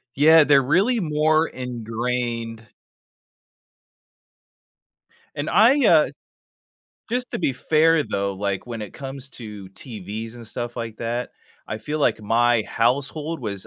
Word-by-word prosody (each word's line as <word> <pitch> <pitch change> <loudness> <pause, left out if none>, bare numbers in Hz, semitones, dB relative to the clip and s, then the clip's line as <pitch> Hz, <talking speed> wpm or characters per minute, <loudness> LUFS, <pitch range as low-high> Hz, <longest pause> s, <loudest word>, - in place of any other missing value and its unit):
Yeah. 160 +3 +7
They're 140 -2 +5
really 195 - +2
more 155 -1 +2
ingrained 115 -1 -4 2.7
And - - -3
I, 260 +4 +5
uh 160 -6 +5 1.0
just 250 +1 -2
to - - -3
be 145 - +1
fair, 155 +3 +3
though, 100 0 -2
like, 100 +1 -3
when 115 -2 -5
it 105 - -8
comes 135 0 -7
to 105 -6 -9
TVs 110 +1 -7
and 115 - -10
stuff 120 +2 -5
like 115 -2 -5
that, 120 +1 -3 0.4
I 110 - -4
feel 150 +6 -4
like 140 -6 +1
my 120 +2 +3
household 140 +8 -1
was 100 -5 -5
125 Hz, 125 wpm, -23 LUFS, 115-155 Hz, 2.7 s, Yeah